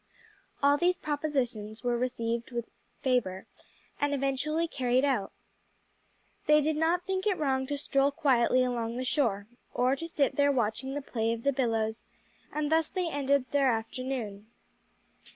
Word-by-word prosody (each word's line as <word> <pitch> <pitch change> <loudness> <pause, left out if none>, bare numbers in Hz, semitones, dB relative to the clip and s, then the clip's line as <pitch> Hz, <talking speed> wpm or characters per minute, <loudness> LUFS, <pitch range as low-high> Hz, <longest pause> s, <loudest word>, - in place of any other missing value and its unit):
All 285 +1 +5
these 355 +3 +2
propositions 260 -8 -2
were 245 -1 +1
received 235 -1 -2
with 235 -2 -5 0.3
favor 230 -8 0 0.5
and 290 0 +1
eventually 280 +4 0
carried 255 -2 +1
out. 250 -9 0 1.2
They 300 0 +7
did 305 +1 +1
not 330 +3 +1
think 380 +1 -1
it 390 -3 +2
wrong 265 -3 0
to 285 - -2
stroll 275 0 +2
quietly 255 -4 +3
along 240 -2 -2
the 255 - -2
shore, 230 -8 +1 0.3
or 255 +2 +3
to 330 +4 -6
sit 290 -4 0
there 285 0 +4
watching 260 +2 -1
the 290 - -3
play 225 -3 -1
of 230 0 -6
the 280 - +2
billows, 225 -4 0 0.5
and 300 0 -2
thus 320 -1 +3
they 365 -2 -1
ended 280 -3 +1
their 275 -2 +3
afternoon. 225 -2 -4
265 Hz, 150 wpm, -29 LUFS, 235-290 Hz, 1.2 s, They